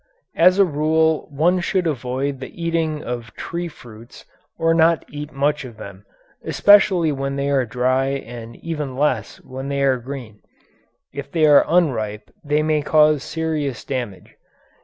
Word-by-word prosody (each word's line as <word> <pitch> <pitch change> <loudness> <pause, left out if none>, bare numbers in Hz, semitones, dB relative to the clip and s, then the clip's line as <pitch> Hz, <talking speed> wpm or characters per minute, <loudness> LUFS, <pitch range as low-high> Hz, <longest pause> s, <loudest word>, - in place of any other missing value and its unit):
As 180 +3 +5
a 200 - +6
rule 160 0 +1
one 165 +6 +2
should 180 +1 -1
avoid 135 -1 -2
the 130 - -10
eating 165 -2 -1
of 120 -2 -6
tree 170 +1 -4
fruits, 120 -6 -14 0.3
or 165 0 +2
not 165 0 +3
eat 150 +1 -7
much 145 +1 0
of 120 -4 -10
them, 100 -1 -11 0.4
especially 190 -5 +4
when 135 0 -3
they 140 0 -1
are 130 -3 +1
dry 130 +3 +1
and 120 -4 -6
even 150 -5 -5
less 135 -6 -1
when 130 +1 -7
they 140 0 -1
are 135 -2 +3
green. 120 -4 -9 0.7
If 140 0 -7
they 160 -2 +3
are 145 -1 +7
unripe 120 -11 0
they 150 +1 +1
may 155 -1 +1
cause 150 -1 +3
serious 150 -4 -3
damage. 125 -8 -5
140 Hz, 155 wpm, -21 LUFS, 130-160 Hz, 0.7 s, are